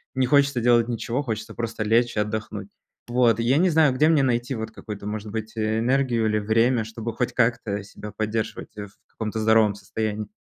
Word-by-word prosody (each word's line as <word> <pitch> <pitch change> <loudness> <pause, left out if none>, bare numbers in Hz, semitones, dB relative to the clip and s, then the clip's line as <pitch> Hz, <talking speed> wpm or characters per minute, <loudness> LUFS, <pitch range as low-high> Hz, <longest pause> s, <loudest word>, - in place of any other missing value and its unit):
не 130 - +2
хочется 140 -2 +3
делать 120 -1 +4
ничего, 120 +3 -2
хочется 110 -3 -5
просто 115 -1 -3
лечь 115 +2 +2
и - - +2
отдохнуть. 105 -1 -4 0.4
Вот 120 -2 +3
и - - 0
я 130 +5 +3
не 185 +2 +4
знаю, 155 -5 +4
где 150 +4 +3
мне 150 -4 +4
найти 125 +1 0
вот 110 -1 -5
какую-то, 105 -2 -8
может 105 0 -5
быть, 110 0 -5
энергию 115 +2 +1
или 105 0 +1
время, 115 +2 +2
чтобы 115 0 -6
хоть 125 +1 -2
как-то 115 -4 0
себя 105 +1 -10
поддерживать 110 0 -3
в 100 -1 -6 0.2
каком-то 110 0 -4
здоровом 110 -1 +4
состоянии. 105 +1 -4
115 Hz, 190 wpm, -24 LUFS, 110-120 Hz, 0.4 s, делать